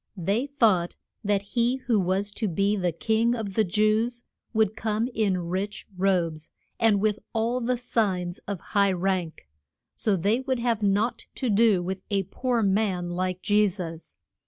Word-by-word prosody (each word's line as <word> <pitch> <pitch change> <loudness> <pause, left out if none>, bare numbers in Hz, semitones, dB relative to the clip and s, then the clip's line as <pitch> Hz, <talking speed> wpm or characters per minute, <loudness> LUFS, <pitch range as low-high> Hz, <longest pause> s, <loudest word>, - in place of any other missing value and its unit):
They 200 - 0
thought 215 -11 +2 0.3
that 200 -1 +1
he 235 +4 +1
who 250 -5 0
was 190 +2 0
to 215 +1 -2
be 200 +3 +1
the 180 -3 0
King 225 +7 +1
of 215 -4 -4
the 220 - +3
Jews 215 +5 +1 0.3
would 220 -2 +2
come 220 +1 -1
in 205 -4 +1
rich 195 +4 -3
robes, 175 -4 0 0.3
and 220 -3 +4
with 215 0 +1
all 235 +2 0
the 250 +1 0
signs 190 -7 -1
of 200 -3 -3
high 200 -1 +4
rank. 180 - -2 0.5
So 210 - +1
they 205 +7 +1
would 260 -1 -1
have 235 -2 0
naught 205 +4 0
to 250 -4 -1
do 205 -3 +4
with 190 +1 -4
a 200 -2 +1
poor 240 +5 -1
man 190 -3 +1
like 185 +1 -2
Je 210 0 +4
sus. 170 -3 -8
205 Hz, 165 wpm, -26 LUFS, 185-225 Hz, 0.5 s, and